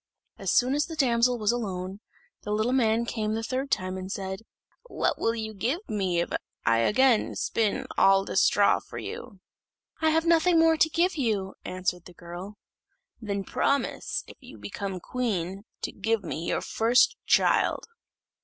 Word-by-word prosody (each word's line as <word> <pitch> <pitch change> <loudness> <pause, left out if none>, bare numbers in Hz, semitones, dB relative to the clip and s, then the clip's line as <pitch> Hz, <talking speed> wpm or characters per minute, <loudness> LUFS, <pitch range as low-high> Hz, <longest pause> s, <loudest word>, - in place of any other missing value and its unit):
As - - -1
soon 250 +2 +3
as 290 0 +1
the 325 - -7
damsel 245 -3 +3
was 215 -1 +1
alone, 195 -5 -4 0.4
the 210 - -5
little 215 +3 +1
man 230 -2 +2
came 215 -2 -2
the 225 - -3
third 260 +4 -2
time, 185 -4 -1
and 185 +1 -6
said, 190 -1 -4 0.5
"What - - -1
will 230 - +1
you 220 -1 -4
give 260 - -2
me 190 -5 0
if - - -4 0.3
I 115 0 +4
again 235 - +3
spin 225 +4 0
all 195 0 +5
this - - +1
straw - - +4
for - - -11
you?" - - -7 0.6
"I 320 - +4
have 325 +1 +2
nothing 335 +1 +4
more 325 0 +5
to 320 0 +3
give 345 +2 +1
you," 210 -8 -1
answered 180 -1 -3
the 180 - -14
girl. 175 +5 -9 0.6
"Then 200 -3 -3
promise, 280 +7 -1
if - - -14
you 260 0 -13
become 200 -2 -5
queen, 195 -4 -3 0.2
to - - -2
give 220 +1 -1
me 165 +2 -4
your - - 0
first 240 +4 +3
child." - - +3
220 Hz, 170 wpm, -27 LUFS, 195-260 Hz, 0.6 s, all